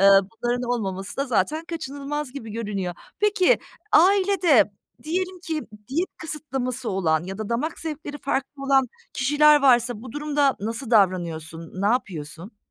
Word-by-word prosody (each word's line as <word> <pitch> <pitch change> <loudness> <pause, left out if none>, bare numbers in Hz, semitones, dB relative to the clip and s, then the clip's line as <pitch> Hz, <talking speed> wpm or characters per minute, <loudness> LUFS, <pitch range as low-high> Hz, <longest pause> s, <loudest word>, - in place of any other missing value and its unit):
eee, 195 - +6
bunların 230 +5 +3
olmaması 195 -5 -3
da 275 - 0
zaten 305 +6 0
kaçınılmaz 290 -3 -5
gibi 230 -6 -7
görünüyor. 200 -5 -3 0.2
Peki, 420 +2 +3 0.3
ailede 370 - +5 0.3
diyelim 365 +3 -2
ki 325 -4 -3 0.3
diyet 335 +8 0
kısıtlaması 265 -6 -3
olan 170 -4 +1
ya 195 +2 -6
da 215 -2 -4
damak 255 +8 -2
zevkleri 300 -2 -5
farklı 275 0 -3
olan 270 -2 +3 0.2
kişiler 295 +2 +5
varsa 240 -4 +4
bu 250 -2 -9
durumda 295 -2 +1
nasıl 225 +3 -3
davranıyorsun? 170 -4 0
Ne - - +2
yapıyorsun? 185 -3 -2
255 Hz, 135 wpm, -24 LUFS, 205-300 Hz, 0.3 s, eee